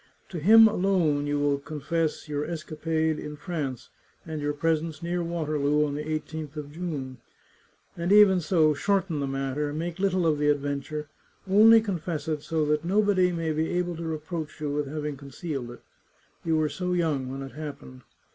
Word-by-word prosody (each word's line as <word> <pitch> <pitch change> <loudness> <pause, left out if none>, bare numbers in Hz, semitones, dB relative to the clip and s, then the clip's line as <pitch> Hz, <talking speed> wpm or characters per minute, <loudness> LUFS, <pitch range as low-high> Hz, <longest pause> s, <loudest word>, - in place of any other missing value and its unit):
To 175 - -5
him 220 +7 +8
alone 180 -8 +1
you 145 0 0
will 145 -1 +1
confess 155 +2 -2
your 145 -1 -2
escapade 160 -1 -2
in 150 0 -6
France, 145 - -5 0.4
and 155 -2 -5
your 145 0 0
presence 160 +1 -1
near 175 +1 -1
Waterloo 150 -3 0
on 145 - -3
the 145 - -3
1 155 +1 -5
8th 155 -2 -7
of 145 -1 -6
June. 145 -6 -5 0.8
And 170 +2 -2
even 205 -3 +7
so, 155 -2 +3
shorten 195 -1 0
the 140 - -1
matter, 135 +2 -2
make 165 +3 -4
little 185 -2 +1
of 155 -2 +2
the 150 - +1
adventure; 145 +1 -2 0.4
only 220 +4 +7
confess 175 -7 -3
it 155 -2 -1
so 160 0 -1
that 150 +1 +1
nobody 190 0 +3
may 165 -2 -2
be 160 +1 -1
able 175 -1 -1
to 165 - -6
reproach 160 0 -5
you 150 -1 -2
with 145 0 -1
having 150 0 -4
concealed 140 -1 -6
it 120 - -12 0.3
— - - -37
you 165 -1 +1
were 155 -1 +2
so 180 +3 -3
young 155 -7 0
when 135 +1 -5
it 135 - -8
happened. 140 -4 -8
155 Hz, 185 wpm, -27 LUFS, 145-170 Hz, 0.8 s, him